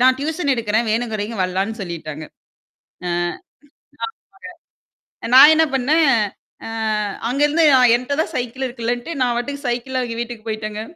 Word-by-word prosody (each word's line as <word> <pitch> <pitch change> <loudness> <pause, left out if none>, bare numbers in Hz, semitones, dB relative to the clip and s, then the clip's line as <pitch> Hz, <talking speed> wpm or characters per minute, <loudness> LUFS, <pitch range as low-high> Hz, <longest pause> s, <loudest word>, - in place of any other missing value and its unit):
நான் 255 +1 +5
டியூஷன் 300 0 -1
எடுக்கிறேன். 225 -1 0
வேணும்ங்கிறவெங்க 220 -1 -2
வரலான்னு 190 +5 -2
சொல்லிட்டாங்க. 155 -4 -6 0.8
அ. - - -1 1.9
ஆமாங்க. - - -10
நான் 290 +4 +10
என்ன 320 +1 +4
பண்ணேன், 295 +4 +3 0.6
அ - - -5 0.6
அங்கிருந்து 295 +5 +2
அ - - +6 0.2
என்ட்ட 255 +3 -3
தான் 325 - -7
சைக்கிள் 250 +2 -3
இருக்குலன்ட்டு, 240 +4 -3
நான் 245 -1 +1
பாட்டுக்கு 280 +3 -5
சைக்கிள்ல 255 +2 -2
அவிங்க 230 -1 -5
வீட்டுக்கு 230 -2 -9
போயிட்டேங்க. 215 0 -4
240 Hz, 130 wpm, -20 LUFS, 220-275 Hz, 1.9 s, நான்